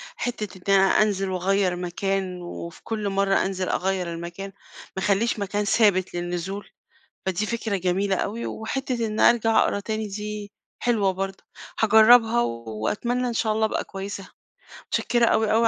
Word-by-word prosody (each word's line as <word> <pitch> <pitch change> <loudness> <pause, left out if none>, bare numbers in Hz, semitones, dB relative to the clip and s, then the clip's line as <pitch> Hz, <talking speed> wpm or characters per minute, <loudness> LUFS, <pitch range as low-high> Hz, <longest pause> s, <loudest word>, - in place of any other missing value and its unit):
حتة 210 -6 -4
إني 195 - +7
أنزل 195 0 +3
واغير 185 0 +1
مكان، 180 +1 -2
وفي 170 -1 -8
كل 215 -3 -2
مرّة 195 0 +2
أنزل 190 -1 -2
أغيّر 185 -2 -1
المكان، 175 +4 -6 0.5
ما 190 - -2
اخليش 210 +2 +1
مكان 205 +1 -1
ثابت 200 -4 +3
للنزول، 175 +3 -4 0.6
فدي 190 +3 0
فكرة 225 -3 -2
جميلة 190 +2 0
أوي، 225 +3 -3
وحتة 240 0 -2
إني 215 0 -1
أرجع 225 -1 +5
اقرا 200 - +2
تاني 215 0 -3
دي 210 0 -6 0.3
حلوة 220 -5 +2
برضه، 195 +1 -5 0.4
هاجرّبها 225 +2 +6
وأتمنى 115 - -2
إن - - -2
شاء 220 -1 +1
الله 220 0 +1
أبقى - - -2
كويسة، 195 0 -7 0.6
متشكرة 235 0 +2
أوي، 220 -1 +2
أوي، 230 +1 +4
200 Hz, 145 wpm, -24 LUFS, 190-220 Hz, 0.6 s, إني